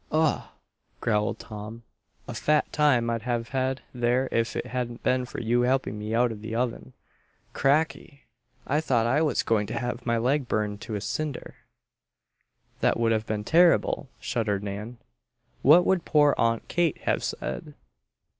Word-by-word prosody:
"Ugh!" 155 0 +2 0.6
growled 105 -2 0
Tom. 110 +2 -9 0.4
"A - - -5
fat 150 0 +1
time 140 -6 +3
I'd 115 -1 -2
have 120 -1 -2
had 130 0 -1
there 125 +1 +1
if 115 0 0
it - - -2
hadn't 120 -2 -4
been 125 0 +1
for - - -7
you 120 +1 +1
helping 125 -4 0
me 105 +2 -3
out 120 0 +3
of 105 -2 -8
the 110 +1 -5
oven. 115 - -2 0.6
Cracky! 145 0 0 0.4
I 150 +2 +1
thought 120 -7 +1
I 130 +6 +2
was 150 -6 +1
going 105 -2 +1
to - - -4
have 120 0 -3
my 115 -1 +1
leg 130 +3 +1
burned 105 -2 -1
to 110 - -5
a 100 - -3
cinder. 145 +7 -4 1.3
"That - - +2
would 115 -1 +2
have 110 0 0
been 105 -1 -2
terrible!" 165 -2 +3
shuddered 105 -4 -1
Nan. 105 +4 -6 0.6
"What 165 +6 +7
would 190 -3 +2
poor 145 -2 +4
Aunt 115 0 0
Kate 170 -3 +1
have - - 0
said?" - - -5
120 Hz, 165 wpm, -26 LUFS, 110-140 Hz, 1.3 s, What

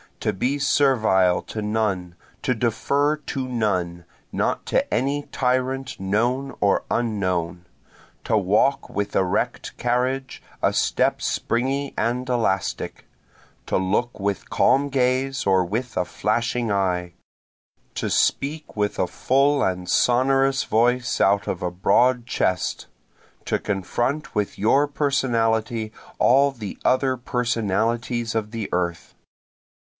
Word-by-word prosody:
To 105 - 0
be 125 +9 0
servile 110 -10 +3
to 110 - -6
none, 105 -5 -1 0.3
to 125 - +2
defer 140 +6 +1
to 135 -3 -4
none, 90 -8 -1 0.3
not - - -1
to - - 0
any 140 +3 0
tyrant 130 +1 -1
known 120 +8 0
or 100 -1 +2
unknown, 90 -7 -1 0.6
To 110 - +2
walk 105 +8 +2
with 100 0 -3
erect 100 +6 -1
carriage, 125 +2 -1 0.2
a - - +2
step - - +1
springy 135 +4 -1
and 125 +2 -1
elastic, 115 -6 -1 0.6
To - - +1
look 105 +6 -1
with 100 -1 -2
calm 140 +1 +3
gaze 135 +1 0
or 95 -2 +3
with 115 +7 -3
a 90 - +1
flashing 115 +3 -1
eye, 90 -3 0 0.8
To - - -2
speak 150 +3 0
with 105 -1 -1
a 90 - +2
full 140 +8 +2
and 90 -1 -2
sonorous 135 +4 +3
voice 120 +3 +1
out 100 +1 +3
of 90 - -3
a 90 - -1
broad 120 +7 +2
chest, 95 -7 -1 0.6
To - - +1
confront 120 +10 -2
with 105 -1 -1
your 135 +8 +3
personality 115 -6 0 0.3
all 140 +3 +4
the 110 -7 -7
other 130 0 +2
personalities 115 0 -1
of 110 -2 -2
the 115 -2 -5
earth. 85 -2 -2
115 Hz, 120 wpm, -23 LUFS, 100-130 Hz, 0.8 s, all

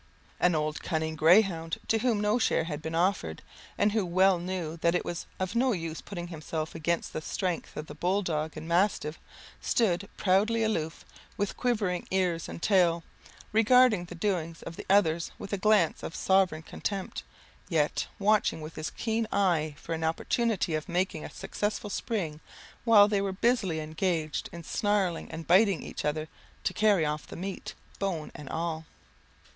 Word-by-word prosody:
An 180 -2 +3
old 150 0 -1
cunning 160 -2 -2
greyhound, 165 0 +4
to 225 - +3
whom 235 -3 +1
no 210 +3 +2
share 195 - +2
had 155 -2 -5
been 160 +1 -4
offered, 170 - 0 0.3
and 205 +1 +3
who 215 -1 +1
well 185 +1 +3
knew 175 -2 -4
that 170 +1 +2
it - - 0
was 175 - -4
of 185 -1 -2
no 250 +1 +3
use 165 -3 -4
putting 175 -3 -6
himself 160 -1 -4
against 165 +1 -1
the 155 - -3
strength 180 +1 -3
of 150 - -4
the 150 - -9
bull 185 +6 0
dog 155 -3 -2
and 160 - -7
mastiff, 170 -3 +1 0.4
stood 200 -4 +1
proudly 215 +4 +3
aloof, 160 -8 -2 0.3
with 205 -1 -1
quivering 210 -8 0
ears 180 -3 0
and - - -8
tail, 175 -4 +3 0.5
regarding 225 -3 +5
the 175 - -9
doings 170 -3 -2
of 165 - -7
the - - -9
others 170 -4 +3
with 205 - -7
a - - +1
glance 205 -5 +3
of 165 - -6
sovereign 190 -5 +2
contempt; 195 +3 -4 0.5
yet, 155 -4 +1
watching 210 -4 +2
with 155 +1 -7
his 155 - -3
keen 225 -1 -1
eye 165 -7 +1
for 165 - -5
an 160 0 -3
opportunity 185 +3 0
of 155 -1 -2
making 175 -2 -1
a - - -6
successful 205 0 -3
spring, 170 -11 -2 0.5
while 210 -3 +8
they 205 -1 +1
were 195 -1 -1
busily 195 -5 +1
engaged 155 0 -2
in 170 0 -8
snarling 195 -1 0
and 160 0 -7
biting 190 -1 +4
each - - -6
other, 155 +1 -1 0.4
to - - 0
carry 205 -6 +3
off 150 0 -3
the - - -9
meat, 190 +2 -5 0.2
bone 180 -6 -2
and 145 - -9
all. 160 -1 -3
175 Hz, 175 wpm, -29 LUFS, 160-205 Hz, 0.5 s, while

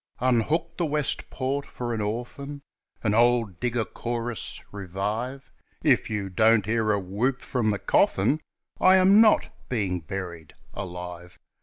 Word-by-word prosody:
"Unhook 130 +7 +1
the 175 - +1
West 150 -1 -1
Port" 135 +2 -2
for 120 -3 -5
an 110 - -2
orphan, 125 +7 -5 0.4
An 105 -2 +2
old 115 -5 +3
digger 120 -2 0
chorus 120 +3 -4
revive 105 +7 -4 0.3
If - - +3
you 105 -3 -2
don't 110 +2 +4
hear 110 0 +1
a 100 - +2
whoop 105 +8 -1
from 120 -5 0
the 105 - +1
coffin, 110 +10 +2 0.4
I 185 0 +6
am 190 +3 +7
not 215 -2 +4 0.2
being 100 -7 -1
buried 85 -1 -7 0.2
alive. 90 -1 -7
115 Hz, 140 wpm, -26 LUFS, 100-130 Hz, 0.4 s, am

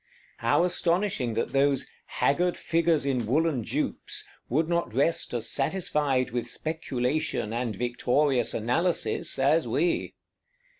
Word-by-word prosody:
How - - +3
astonishing 175 - 0
that 115 - -2
those 140 -1 +2 0.2
"haggard 175 +5 +1
figures 165 -3 +1
in 125 -5 0
woollen 145 -1 +1
jupes" - - -3 0.2
would 155 +6 +1
not 170 -9 -1
rest 150 +5 +1
as 120 -2 -2
satisfied 140 -4 0
with 120 0 -2
Speculation, 140 -5 -2
and 120 -2 -2
victorious 125 +2 +1
Analysis, 125 +2 0
as 145 +5 +3
we! 175 0 0
140 Hz, 115 wpm, -27 LUFS, 125-165 Hz, 0.2 s, How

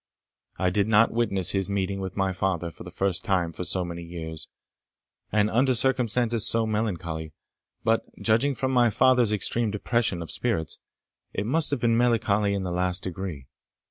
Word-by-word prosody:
I 90 -1 +1
did 100 +2 +1
not 110 +1 +4
witness 100 -6 +1
his 95 -1 -1
meeting 100 0 -2
with 95 0 -6
my 95 -1 +1
father 90 -3 -2
for - - -11
the 90 - -9
first 95 0 -1
time 90 -4 0
for 90 - -5
so 90 0 0
many 85 0 -6
years, 80 -2 -7 0.8
and 105 0 +3
under 125 +4 +2
circumstances 120 -2 +3
so 115 0 +3
melancholy; 85 -8 -3 0.5
but, 115 0 +1
judging 115 +6 +2
from 130 +3 -1
my 120 -2 +4
father's 125 0 +3
extreme 110 +2 0
depression 105 -3 -1
of 80 - -7
spirits, 80 -5 -2 0.5
it 100 - -2
must 155 +7 +2
have 140 -4 -2
been 115 -1 +2
melancholy 105 -4 +2
in 100 - -2
the 90 - -3
last 90 0 0
degree. 90 -6 -5
100 Hz, 175 wpm, -26 LUFS, 90-115 Hz, 0.8 s, not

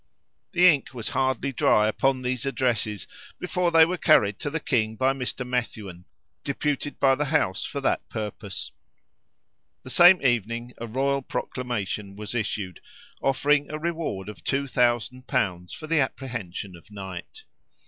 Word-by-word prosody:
The 175 +1 +5
ink 140 -6 +3
was 115 -3 -4
hardly 130 0 0
dry 105 -4 +3
upon 130 +4 +1
these 125 0 -1
addresses 115 -6 -1 0.3
before 180 -1 0
they 165 -1 +7
were 180 +1 -3
carried 105 - +4
to 145 - -2
the 160 +3 -2
king 110 -7 0
by 130 +4 +2
Mr. 125 -1 -4
Methuen, 105 -8 -4 0.4
deputed 145 0 -2
by 135 -1 +5
the 145 +3 0
House 125 -9 +1
for 140 - -4
that - - 0
purpose. 105 -3 -5 1.1
The 130 - -7
same 175 +4 +8
evening 120 0 0
a 115 - -5
royal 135 +4 0
proclamation 105 -6 -4
was 105 +2 -6
issued, 105 -5 -3 0.4
offering 145 +2 +2
a 155 - -4
reward 160 - -3
of 105 -2 -9
two 140 +1 0
thousand 125 0 0
pounds 90 -3 -1
for 155 - -8
the 160 0 +2
apprehension 115 -9 -3
of 85 - -17
Knight. 95 -4 -8
125 Hz, 150 wpm, -26 LUFS, 105-140 Hz, 1.1 s, same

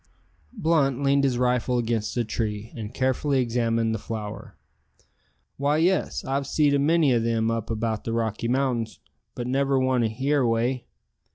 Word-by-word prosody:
Blunt 140 -5 +1
leaned 140 0 +3
his 130 -3 +1
rifle 125 0 +1
against 115 -1 -1
a 120 - +2
tree, 110 0 -3
and 110 -2 -6
carefully 130 +2 0
examined 115 -2 0
the 110 - -2
flower. 110 -1 -7 1.0
"Why, 145 +2 +1
yes, 180 +4 +1
I've 135 +1 -1
seed 145 -1 +2
a 140 - +3
many 155 -1 +3
o' 120 - +3
them 115 0 0
up 115 -2 -3
about 110 -1 -2
the 115 - -3
Rocky 115 0 -1
Mountains, 120 -4 -1 0.4
but 120 - -4
never 135 +2 +1
one 130 -1 +2
here 135 +6 +1
away. 120 +1 0
125 Hz, 160 wpm, -25 LUFS, 115-135 Hz, 1.0 s, leaned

